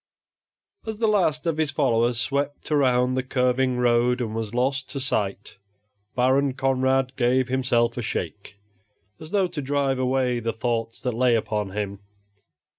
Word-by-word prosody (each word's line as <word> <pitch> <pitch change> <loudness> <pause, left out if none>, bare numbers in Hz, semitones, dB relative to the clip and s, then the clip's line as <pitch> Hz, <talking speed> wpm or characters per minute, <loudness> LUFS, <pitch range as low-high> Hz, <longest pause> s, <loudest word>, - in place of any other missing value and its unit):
As 220 -1 -4
the 225 - 0
last 175 -8 +1
of 165 -2 0
his 155 -2 +1
followers 120 -5 +1
swept 140 +6 -2
around 130 -3 +3
the 130 - 0
curving 125 0 +1
road 125 0 +2
and 115 -3 -3
was 110 -2 -3
lost 130 +2 -1
to 140 - -4
sight, 105 -7 -2 0.6
Baron 130 +2 +2
Conrad 130 0 +1
gave 125 0 +2
himself 120 -2 +1
a - - -1
shake, 105 -2 -5 0.6
as 155 - -10
though 195 0 +2
to 170 -4 -4
drive 135 -1 0
away 130 -1 +1
the 115 0 -2
thoughts 115 -1 -2
that 125 - -2
lay 120 +1 +3
upon 105 -2 -1
him. 100 0 -4
125 Hz, 155 wpm, -24 LUFS, 120-135 Hz, 0.6 s, around